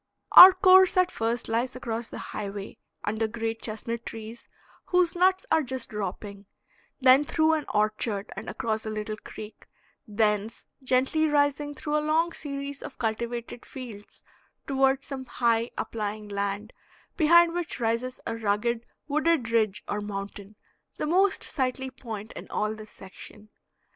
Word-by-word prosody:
Our 370 +1 +12
course 375 -1 +6
at 365 0 +4
first 230 +1 -2
lies 235 +3 -1
along 235 -2 -4
the - - -8 0.2
highway, 200 0 -6 0.2
under 220 +2 -1
great 225 0 -4
chestnut 230 +1 -5
trees 225 +1 -9 0.4
whose 360 -2 +2
nuts 375 +1 +3
are 320 - +4
just 260 -3 -2
dropping, 200 -1 -6 0.5
then 260 +1 +6
through 315 +2 +2
an 310 -2 -1
orchard 215 -1 -1
and 195 - -7
across 220 -1 -2
a 220 - -4
little 215 0 -4
creek, 215 0 -11 0.4
thence 210 0 -1 0.2
gently 265 +5 +2
rising 290 0 +1
through 300 +2 -2
a - - +2
long 315 +3 +1
series 280 -2 -6
of - - -9
cultivated 235 +1 -4
fields 230 -6 -10 0.4
toward 270 0 +2
some 265 -2 -6
high, 235 -1 +1
uplying 210 -1 -4
land, 200 +2 -3 0.4
behind 340 +1 +5
which 345 -5 -3
rises 235 +2 -1
a 230 - -3
rugged 230 +2 -1 0.2
wooded 305 -5 +1
ridge 215 -4 +1
or 210 - -2
mountain, 200 0 -7 0.4
the - - -2
most 380 +5 +2
sightly 260 0 -1
point 220 -4 -8
in - - -10
all 215 0 -1
this 215 -1 -11
section. 210 +2 -13
235 Hz, 145 wpm, -27 LUFS, 215-285 Hz, 0.5 s, Our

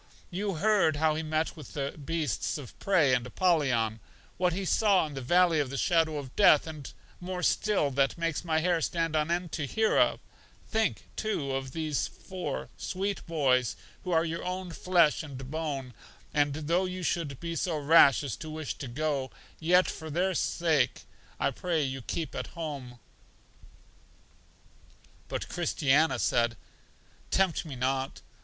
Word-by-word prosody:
You 195 +1 -2
heard 200 -3 +3
how 155 +1 +2
he 155 - -2
met 155 +1 -1
with 150 -5 -11
the 140 -1 -2
beasts 155 -2 -2
of 140 -5 -9
prey 165 -9 +3
and 125 -1 +2
Apollyon, 125 -9 +1 0.4
what 180 -1 +2
he 190 +3 -3
saw 200 -2 +3
in 150 - -7
the 135 - -5
Valley 175 +4 +4
of 140 -3 0
the 135 - -4
Shadow 160 0 +2
of 135 -3 -7
Death, 195 -7 +6
and 155 -3 -8 0.3
more 180 0 -4
still 200 -10 +2
that 135 +3 +1
makes 165 -2 -1
my 160 -2 +1
hair 175 -1 +2
stand 165 -1 -1
on 155 +1 +1
end 175 -1 -1
to 145 -4 -2
hear 220 +8 +2
of; - - +3 0.5
think, 220 -1 0
too, 155 -11 -2
of 135 -1 -3
these 155 -3 -1
four 185 -1 -6
sweet 195 +1 -3
boys 130 -7 +2 0.3
who 185 - -5
are 165 -1 +3
your 165 0 -3
own 180 0 -4
flesh 170 -3 +3
and 135 -3 -8
bone; 145 -5 -3 0.4
and, 145 -1 +2
though 165 +5 +1
you 185 0 -5
should 155 -6 -2
be 170 -1 -4
so 165 -1 -1
rash 145 -2 +6
as 135 -6 -3
to 155 - -8
wish 155 -1 -4
to 135 - -5
go, 140 +1 -1 0.3
yet 180 +3 +4
for 160 0 -6
their 180 +5 +1
sale, 160 -7 +2 0.5
I - - +1
pray 165 +2 -1
you 135 -1 -3
keep 160 +6 -4
at - - -4
home. 140 -7 -5 2.3
But - - -4
Christiana 160 -3 +2
said: 120 -2 +1 0.7
Tempt 190 -3 +1
me 145 -4 -6
not. 130 +2 -1
155 Hz, 165 wpm, -29 LUFS, 140-175 Hz, 2.3 s, Death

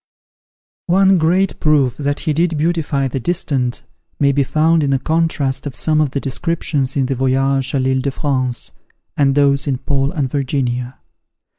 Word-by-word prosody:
One 190 +1 +4
great 180 +4 +1
proof 140 -5 +2
that 145 0 -2
he 155 - 0
did 165 +1 0
beautify 150 -4 0
the 135 - -3
distant, 130 -5 -1 0.4
may 140 -1 +3
be 140 0 +2
found 160 +4 +2
in 145 - 0
the 135 - +2
contrast 150 -2 -1
of 135 - -6
some 155 +4 +1
of 150 - +1
the 140 - -3
descriptions 140 -1 -2
in 135 - +2
the 135 - -1
"Voyage 135 +1 +1
à 140 - +1
l'Ille 130 0 +1
de 140 - -1
France," 130 - -2 0.4
and 135 -2 +2
those 140 0 +2
in 135 -2 0
"Paul 135 +1 -1
and 150 -6 -1
Virginia." 125 -2 -2
140 Hz, 170 wpm, -18 LUFS, 130-155 Hz, 0.4 s, One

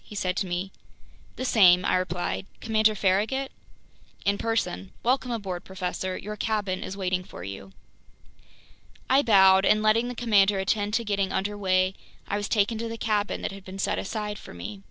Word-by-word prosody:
he 210 - -12
said 185 -2 -1
to 190 - -1
me. 180 +2 -3 0.6
"The 255 - -4
same," 185 -7 +6
I - - +2
replied. 180 +1 -2
"Commander 220 -1 +2
Farragut?" 210 +8 0 0.7
"In 200 0 +1
person. 225 - -2
Welcome 255 +1 +1
aboard, 195 -7 -4
professor. 185 0 -4
Your 210 +1 -6
cabin 205 -3 -2
is 195 - -6
waiting 185 -1 -1
for 90 - -10
you." 95 0 -8 1.4
I 270 +2 +6
bowed, 190 -5 +6
and 215 +1 +3
letting 225 +3 +3
the 245 - -5
commander 210 -4 +3
attend 205 +2 0
to 235 - +1
getting 200 -3 -1
under 205 +2 -1
way, 185 -2 +1 0.3
I 200 - -1
was 205 0 -3
taken 215 +1 +1
to 230 - -3
the 230 - -5
cabin 210 -2 -1
that - - -2
had 195 -1 -10
been 190 0 -9
set 195 - -1
aside 210 0 -4
for - - -12
me. 95 +4 -7
200 Hz, 180 wpm, -26 LUFS, 185-215 Hz, 1.4 s, same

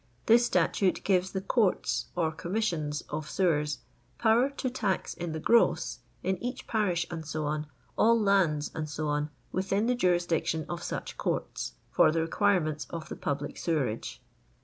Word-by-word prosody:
This 235 +1 +6
statute 180 +1 +1
gives 185 -1 +2
the 190 - -2
"Courts" 205 -1 +1
or 165 -3 +1
"Commissions" 170 -4 -2
of 155 +1 -4
Sewers, 150 -7 +1 0.4
power 235 +4 +4
'* - - -27
to 260 - -1
tax 215 -7 -1
in 175 -1 -4
the 160 - -3
gross'* 160 - +3 0.2
in 190 -1 -1
each 250 +1 -4
parish, 185 -6 +1
&c., 160 -2 -5
all 155 +9 0
lands, 185 -8 +2
&c., 155 0 -4 0.5
within 195 +3 0
the 250 - +3
jurisdiction 175 -7 +1
of 175 -1 -4
such - - -5
courts, - - -2 0.2
for - - +5
the 165 +1 +1
requirements 165 -3 +1
of 165 -2 -6
the - - -5
public 145 +1 -3
sewerage. 125 - -2
175 Hz, 150 wpm, -29 LUFS, 155-200 Hz, 0.5 s, This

